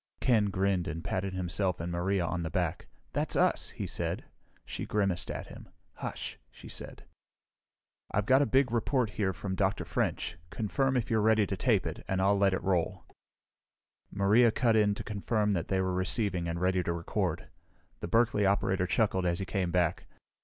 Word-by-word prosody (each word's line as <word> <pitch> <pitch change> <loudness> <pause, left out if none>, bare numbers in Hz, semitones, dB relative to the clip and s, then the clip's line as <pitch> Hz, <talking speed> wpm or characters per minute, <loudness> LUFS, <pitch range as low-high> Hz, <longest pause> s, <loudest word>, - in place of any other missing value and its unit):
Ken 115 -5 +3
grinned 95 -2 0
and 80 0 -4
patted 95 0 -2
himself 90 0 0
and 85 +1 -3
Maria 90 +1 0
on 85 +1 -2
the 80 - -3
back. 75 - -2 0.3
"That's - - -1
us," - - +2
he - - -5
said. - - -3 0.4
She - - -5
grimaced 100 -4 0
at - - -4
him. - - -12 0.3
"Hush!" - - -5
she - - -13
said. - - -7 1.1
"I've 105 +1 0
got 130 +4 +5
a 145 - +2
big 130 -2 +3
report 120 0 +1
here 95 0 0
from 95 0 -5
Dr. 95 +1 0
French. 85 - -2
Confirm 130 +7 0
if 115 - -2
you're 110 -1 +3
ready 110 -1 +4
to 95 - -3
tape 105 -1 +2
it, - - -5
and 95 - 0
I'll 100 +2 +4
let 100 -1 +3
it - - -5
roll." 90 -4 0 1.0
Maria 105 +5 +4
cut 115 0 +2
in 105 -2 +3
to - - -6
confirm 105 +1 0
that 85 -4 -1
they 95 - 0
were 95 -1 0
receiving 95 -1 0
and 85 0 -2
ready 90 0 +2
to 85 -1 -1
record. 85 -2 -2 0.5
The - - -4
Berkeley 115 -2 +3
operator 95 -1 +2
chuckled 95 -2 +1
as 85 0 +1
he 95 - -3
came 95 -3 -1
back. 85 0 0
95 Hz, 185 wpm, -30 LUFS, 90-105 Hz, 1.1 s, got